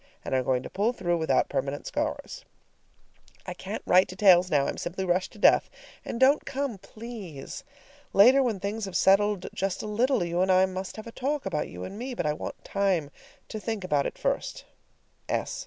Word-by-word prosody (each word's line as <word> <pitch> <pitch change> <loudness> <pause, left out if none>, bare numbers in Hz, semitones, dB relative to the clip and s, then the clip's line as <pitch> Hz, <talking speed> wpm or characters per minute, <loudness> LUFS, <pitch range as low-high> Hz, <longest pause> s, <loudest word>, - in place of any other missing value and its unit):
and - - -3
are 130 - +3
going 130 0 0
to - - -7
pull 210 +5 +1
through 175 -7 -1
without 160 - +2
permanent 140 +1 -3
scars. - - -3 1.0
I - - -5
can't - - -6
write 185 +1 +5
details 185 -2 +5
now; 145 -4 +3
I'm - - -3
simply 190 +2 -3
rushed 180 +1 0
to - - -14
death. 205 - +5 0.3
And 230 - -5
don't 275 +3 +5
come 270 -6 -3
please! 210 - -9 0.5
Later, 250 +7 +7
when 230 -7 0
things 205 +3 -3
have 195 - -7
settled 195 -1 +3
just 190 0 -2
a - - -5
little, 230 +2 +1
you 170 +1 -1
and 190 0 +3
I 185 0 +5
must 190 0 -5
have 215 - -8
a 230 - -8
talk 275 +4 -2
about 175 -6 -1
you 90 +1 -8
and 200 - -7
me, 250 +1 -5
but - - -2
I 150 - +1
want - - -7
time 185 -7 0 0.4
to 220 - -5
think 220 -2 -4
about 145 -6 +1
it - - -7
first. - - -2
195 Hz, 195 wpm, -27 LUFS, 175-225 Hz, 1.0 s, Later